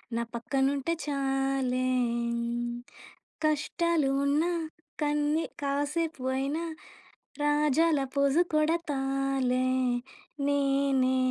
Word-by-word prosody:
నా 235 - 0
పక్కనుంటే 270 +5 0
చాలే 270 -2 0 1.5
కష్టాలు 310 0 +1 0.2
ఉన్నా 300 +5 +2 0.5
కన్ని 295 +2 +1 0.2
కాసేపు 290 +1 -1
అయినా 285 +5 -1 0.8
రాజాల 295 +1 +3 0.2
ఫోజు 280 +3 +4
కొడతాలే 275 -5 +1 0.8
నేనే. 275 -2 +2
280 Hz, 65 wpm, -29 LUFS, 270-300 Hz, 1.5 s, ఫోజు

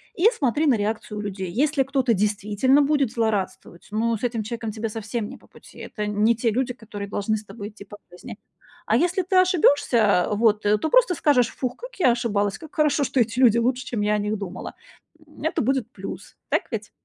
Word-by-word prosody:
и 370 +3 +4
смотри 290 +3 +1
на 265 - +5
реакцию 210 0 -3
людей. 195 -3 -4
Если 280 - +1
кто-то 265 -2 +1
действительно 210 +6 +2
будет 280 -4 +1
злорадствовать, 210 -6 -3
ну, 230 +2 0
с 220 - -9
этим 235 -3 -1
человеком 225 0 -5
тебе 220 +1 -4
совсем 220 0 -4
не 260 - -9
по - - -23
пути. - - -17
Это 210 - -5
не 210 +2 +2
те 230 +1 0
люди, 250 +3 -1
которые 210 -4 -8
должны 205 +2 -1
с 215 - -5
тобой 205 +1 -8
идти 210 -1 -13
по 205 +1 -12
жизни. 180 +1 -10 0.5
А - - +2
если 360 +2 +2
ты 375 +2 -2
ошибёшься, 285 - +4
вот, 210 0 +2
э, 210 +1 +4
то 315 - -2
просто - - +4
скажешь: 265 -7 +3
"Фух, 250 -2 -2
как - - -10
я 260 -9 +5
ошибалась, 210 -4 -1
как 315 -2 -13
хорошо, 300 -1 +2
что 270 - 0
эти 230 +1 +1
люди 235 -3 +5
лучше, 250 +2 0
чем 230 -4 -3
я 210 0 +1
о - - +2
них 210 +1 -2
думала". 190 -2 -7 0.5
М, 300 -1 -14
это 320 - 0
будет 255 -1 -1
плюс, 195 -5 -9
так - - +1
ведь? - - -4
230 Hz, 210 wpm, -23 LUFS, 210-270 Hz, 0.5 s, на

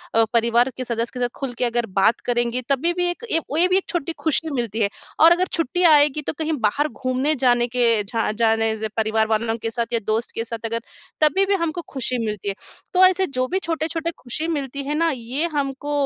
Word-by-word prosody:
अ, 225 - +6
परिवार 235 +2 +3
के 255 - -3
सदस्य 235 -1 -2
के 250 - -6
साथ 245 -1 0
खुल 270 -3 -3
के 250 - +1
अगर 240 -1 0
बात 220 +4 +4
करेंगी, 240 +1 0
तभी 290 +6 +1
भी 355 0 0
एक 445 +7 -5
ये 325 - +3
वे 335 +4 +3
भी 370 +1 +3
एक 385 - -1
छोटी 340 -2 -2
खुशी 320 0 +1
मिलती 230 -3 -2
है। 200 - +2 0.3
और 325 +2 +8
अगर 360 +2 +4
छुट्टियाँ 335 +2 +3
आएगी 295 0 +4
तो - - 0
कहीं 315 0 -1
बाहर 290 +8 0
घूमने 260 +2 -1
जाने 240 -2 +3
के 235 -3 +2
झा 225 +2 -1
जाने 225 0 +1
से 220 0 -3
परिवार 220 0 +1
वालों 225 +1 0
के 225 - -2
साथ 235 0 -3
या 230 - +2
दोस्त 220 +2 -1
के 230 - -1
साथ 230 0 -6
अगर 230 +1 -2 0.4
तभी 345 +6 +4
भी 395 - +2
हमको 335 +2 -3
खुशी 255 -2 -2
मिलती 210 -2 -3
है। 195 - -3 0.4
तो 370 0 +5
ऐसे 375 0 +3
जो 255 -2 -1
भी 380 - +1
छोटे-छोटे 325 0 -2
खुशी 280 +6 -4
मिलती 280 -3 -3
है 295 +2 -2
ना, 330 0 +2
ये 260 +4 -2
हमको 280 0 -2
255 Hz, 230 wpm, -22 LUFS, 230-320 Hz, 0.4 s, और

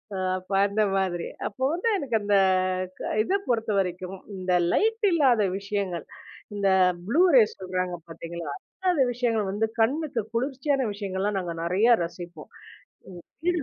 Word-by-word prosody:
அ - - -3 0.2
அப்ப 185 +2 -17 0.2
அந்த 210 +1 +1
மாதிரி, 180 -3 -1 0.2
அப்போ 235 +6 -7
வந்து 370 +7 0
எனக்கு 240 -6 0
அந்த 205 0 +3 0.9
இத - - -1
பொறுத்தவரைக்கும் 195 -5 -1 0.2
இந்த 185 -1 -1 0.2
லைட் 445 0 +2
இல்லாத 260 -9 +4 0.2
விஷயங்கள், 195 -4 -3 0.5
இந்த 200 -1 0 0.4
ப்ளூ 290 - +3
ரேஸ் 220 -3 +5
சொல்றாங்க 185 -1 -2
பாத்தீங்களா, 165 -1 -6 0.4
அந்த 300 - +1
விஷயங்கள் 225 -5 0
வந்து 210 +3 0 0.2
கண்ணுக்கு 270 +1 0
குளிர்ச்சியான 265 +1 0
விஷயங்கள்லாம் 200 0 -2
நாங்க 175 -2 -4
நெறைய 210 +7 +4
ரசிப்போம். 170 -1 -8 0.9
வீடு 350 -2 +1
205 Hz, 130 wpm, -26 LUFS, 185-250 Hz, 0.9 s, ரேஸ்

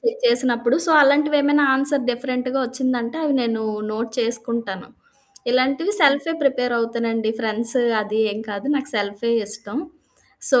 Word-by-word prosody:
చే 465 -2 0
చేసినప్పుడు. 245 - +4
So, - - 0
అలాంటివేమైనా 290 0 +2
answer 275 -1 +1
డిఫరెంట్‌గా 255 +1 -4
వచ్చిందంటే 255 0 -3
అవి 285 -2 0
నేను 225 -1 -3 0.3
నోట్ 225 +1 -5
చేసుకుంటాను. 230 -4 -1 0.6
ఇలాంటివి 275 +10 0
సెల్ఫే 285 +3 +2
ప్రిపేర్ 250 -3 -1
అవుతానండి. 230 -1 -3
ఫ్రెండ్స్ 230 +2 +1 0.3
అది 210 +1 -5
ఏం 210 - -7
కాదు. 205 +6 -7
నాకు 280 +1 0
సెల్ఫే 205 +3 -3
ఇష్టం. 215 +4 0 0.7
సో, 255 -3 +4
245 Hz, 130 wpm, -19 LUFS, 230-275 Hz, 0.7 s, చేసినప్పుడు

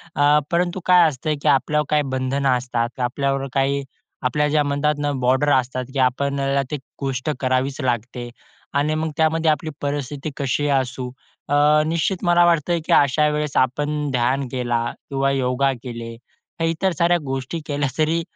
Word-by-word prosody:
अ, 145 +1 +4
परंतु 175 +2 0
काय 180 -2 +6
असतं, 150 +2 -2
की - - -2
आपल्यावर 150 +2 +2
काही 150 -1 +3
बंधनं 130 +1 0
असतात. 125 0 -3
आपल्यावर 135 +2 -1
काही 140 +1 +1 0.4
आपल्या 150 +4 +1
ज्या 150 0 +2
म्हणतात 145 +1 0
ना 145 0 0
बॉर्डर 130 +4 +2
असतात, 130 0 0
की 135 - -2
आपल्याला 140 +2 +1
ती 150 - -1 0.2
गोष्ट 135 +1 -2
करावीच 130 +2 0
लागते 120 0 -2 0.4
आणि 145 +2 +1
मग 160 0 -1
त्यामध्ये 160 0 +3
आपली 155 +1 -2
परिस्थिती 145 0 -3
कशी 140 +2 0
असू. 130 -1 -1 0.4
अ, - - 0 0.3
निश्चित 170 +4 -1
मला 175 -1 +5
वाटतं, 170 0 +2
की - - +1
अशा 150 +2 +4
वेळेस 150 -1 -2
आपण 145 +3 0
ध्यान 130 +2 0
केला 120 -2 -1 0.3
किंवा 135 0 +1
योगा 135 +1 +1
केले 115 -2 -7 0.5
इतर 165 +4 +1
साऱ्या 175 +2 +3
गोष्टी 135 +5 -3
केल्या, 145 -1 -1
तरी 160 +2 +2
140 Hz, 155 wpm, -21 LUFS, 130-150 Hz, 0.5 s, काय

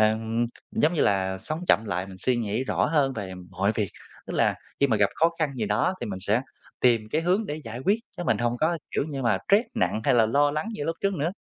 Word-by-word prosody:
ừm, 110 +2 +2 0.2
giống 160 +3 +2
như - - 0
là, 95 -1 +1
sống 155 - -4
chậm 110 - +4
lại, 95 -1 -2
mình 95 - -10
suy 125 +5 +1
nghĩ 110 +2 -1
rõ - - +1
hơn 145 -4 +2
về 95 -5 -5 0.2
mọi 95 +3 +1
việc. 105 -3 0 0.4
Tức - - -5
là - - +3 0.3
khi 140 - +5
mà 110 -4 +2
gặp 100 -1 +4
khó 165 +1 +3
khăn 155 -4 0
gì 125 - -2
đó 110 - +1
thì - - -3
mình 95 -2 -4
sẽ 105 +5 +1 0.4
tìm 120 -3 +4
cái 155 - +1
hướng 185 +5 +1
để 150 +1 -4
giải 115 +2 -6
quyết 205 +3 +4 0.2
chứ 175 - -4
mình - - +2
hông 120 0 +1
có, 165 +2 +2
kiểu - - 0
như 135 -3 -4
mà, 120 - +2
stress 210 +4 +5
nặng 165 - 0
hay 135 - +4
là 115 -2 +5
lo 145 +5 +3
lắng 155 +9 -2
như 145 - -4
lúc 165 0 -2
trước 200 0 +1
nữa. 160 +1 0
125 Hz, 260 wpm, -26 LUFS, 110-155 Hz, 0.4 s, khi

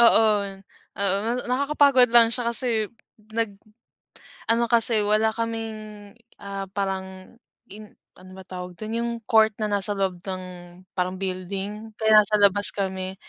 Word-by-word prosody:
oo, 230 -1 +6 0.7
oo 200 -1 +1
na 230 - 0 0.2
nakakapagod 275 -1 +4
lang 230 -1 +7
siya 240 -1 -1
kasi 250 +2 -1 0.7
nag 220 -3 -1 0.9
ano 235 +1 +3
kasi 230 -1 +3
wala 215 +1 +2
kaming, 220 -2 -5 0.3
ah, 195 -1 -5
parang 190 0 -5 0.4
in 210 +1 -12 0.2
ano 185 0 -14
ba - - -9
tawag 180 -1 -8
dun 220 +1 -5
yung 235 0 -1 0.2
court 220 -1 +5
na - - +1
nasa 200 0 +1
loob 190 -2 -1
ng 185 -1 -5 0.5
parang 180 0 -1
building. 195 +3 -5
Kaya 220 -1 +5
nasa 210 +1 -4
labas 205 0 +4
kami, 190 -1 -3
210 Hz, 140 wpm, -24 LUFS, 190-225 Hz, 0.9 s, lang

